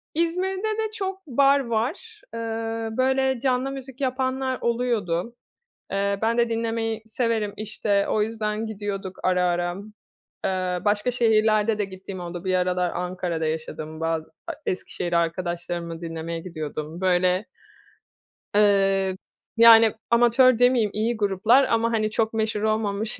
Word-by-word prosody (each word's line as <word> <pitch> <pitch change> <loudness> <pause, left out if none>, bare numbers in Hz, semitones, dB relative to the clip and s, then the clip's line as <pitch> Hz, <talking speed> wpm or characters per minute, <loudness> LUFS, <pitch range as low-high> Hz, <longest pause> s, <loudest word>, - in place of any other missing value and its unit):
İzmir'de 375 +6 0
de 440 -1 -2
çok 385 -3 -5
bar 275 +1 +4
var. 270 - -3
Iıı, 225 -1 -4
böyle, 265 0 +2
canlı 260 +1 0
müzik 265 -1 -9
yapanlar 260 0 -1
oluyordu. 235 -4 -1 0.6
Eee, 200 0 0
ben 230 +1 +1
de 235 0 +2
dinlemeyi 225 -1 -2
severim, 225 -2 -1
işte, 210 -1 -1
o 215 - +1
yüzden 215 0 -2
gidiyorduk 200 -3 -5
ara 180 -1 +2
ara. 175 0 0 0.7
Eee, 185 -1 -1
başka 210 +4 +1
şehirlerde 220 -2 +3
de 210 - 0
gittiğim 190 0 -9
oldu. 175 0 -6
Bir 185 0 +1
aralar 180 0 +1
Ankara'da 180 -2 -3
yaşadım 155 0 -4
ba 165 0 0 0.4
Eskişehir'e 175 -1 -2
arkadaşlarımı 170 0 -3
dinlemeye 165 0 -5
gidiyordum, 155 -1 -6
böyle 185 +1 +2 1.1
ııı, 195 -2 +3 0.4
yani, 225 -1 +8 0.2
amatör 240 +1 +5
demeyeyim 245 -4 +3
iyi 225 +2 -1
gruplar 215 +6 +4
ama 230 -2 +1
hani 215 -2 0
çok 220 0 0
meşhur 220 -1 -1
olmamış 215 0 -1
215 Hz, 125 wpm, -24 LUFS, 185-235 Hz, 1.1 s, yani